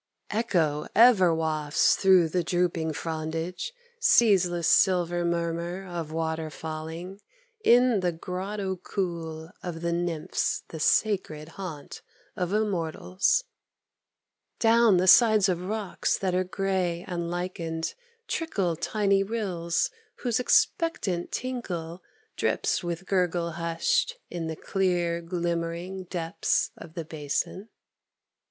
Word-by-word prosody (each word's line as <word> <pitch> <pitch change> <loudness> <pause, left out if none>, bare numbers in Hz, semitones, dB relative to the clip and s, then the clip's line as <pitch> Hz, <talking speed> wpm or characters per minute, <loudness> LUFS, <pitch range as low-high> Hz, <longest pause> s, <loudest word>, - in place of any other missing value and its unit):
Echo 165 -9 0
ever 215 -6 +7
wafts 155 -2 +2
through 185 -3 +5
the 175 +2 0
drooping 170 -3 0
frondage, 160 - -4 0.3
Ceaseless 190 - +4
silver 175 -2 +3
murmur 170 +2 -2
of 170 -4 -5
water 160 0 -2
falling 160 +5 -7 0.4
In 245 - +5
the 180 -1 +1
grotto 190 +3 -4
cool 170 -4 -4
of 170 -2 -6
the 170 0 0
Nymphs, 170 -2 -1
the 160 - -7
sacred 160 -4 +1
Haunt 165 -5 -8 0.3
of 180 -1 -2
Immortals; 200 - +1 1.1
Down 225 -3 +5
the 180 - +2
sides 215 +1 +7
of 180 -2 0
rocks 210 -2 -1
that 190 -2 -1
are 185 +1 +2
gray 185 -2 -1
and 170 -2 -3
lichened 170 -2 -3 0.3
Trickle 195 - -1
tiny 200 +3 +1
rills, 190 -6 -1 0.3
whose 240 -2 +1
expectant 245 - +1
tinkle 185 -10 -4 0.3
Drips - - 0
with 175 +1 -4
gurgle 175 -3 0
hushed 325 - 0 0.2
in 170 -2 -3
the 160 - -4
clear 175 -2 0
glimmering 170 +2 -3
Depths 170 0 -1
of 165 0 -12
the 165 -2 -4
basin. 155 +7 -3
175 Hz, 110 wpm, -27 LUFS, 165-195 Hz, 1.1 s, ever